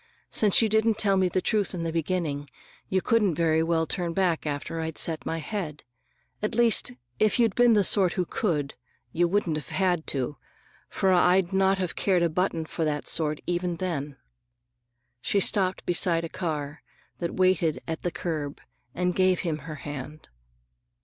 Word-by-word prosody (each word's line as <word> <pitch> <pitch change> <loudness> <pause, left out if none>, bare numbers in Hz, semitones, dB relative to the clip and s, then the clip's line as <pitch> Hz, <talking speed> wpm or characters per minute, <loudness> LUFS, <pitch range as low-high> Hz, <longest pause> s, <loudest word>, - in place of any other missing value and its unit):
Since 210 +1 +5
you - - +3
didn't 220 0 +2
tell 200 -3 +3
me 190 -1 +2
the 185 0 -1
truth 205 -3 0
in 170 - -4
the 165 -1 -3
beginning, 160 -4 -2 0.4
you 190 -1 0
couldn't 210 -8 +2
very 160 -1 +2
well 165 0 +1
turn 170 0 -2
back 175 -4 0
after 150 +3 -4
I'd 160 -1 -4
set 160 -2 0
my 165 - -2
head. 160 -3 -5 0.6
At 215 +2 -2
least, 230 - +3 0.3
if 215 -2 +3
you'd 230 -4 +3
been 240 -1 +5
the 205 -2 +4
sort 185 -2 +4
who 180 - -1
could, 150 -9 -2 0.4
you 175 +4 +2
wouldn't 175 -4 0
have 150 - -7
had 180 -4 0
to,—for 145 +7 -3
I'd 180 +1 +3
not 190 0 +3
have 185 -3 -3
cared 185 -3 +2
a 170 - +2
button 165 -1 -1
for 165 - -4
that 150 -1 -2
sort, 155 -2 +1
even 175 0 -1
then." 150 -6 -4 1.0
She 200 - +1
stopped 190 -1 +1
beside 170 -1 +1
a 165 - -4
car 150 -4 -4 0.4
that 170 -1 -3
waited 185 -4 +2
at 160 -1 -4
the 175 - -1
curb 155 -5 -4 0.4
and 180 0 0
gave 185 -1 +2
him 160 -4 -2
her 155 - -5
hand. 145 +1 -8
175 Hz, 175 wpm, -26 LUFS, 160-190 Hz, 1.0 s, Since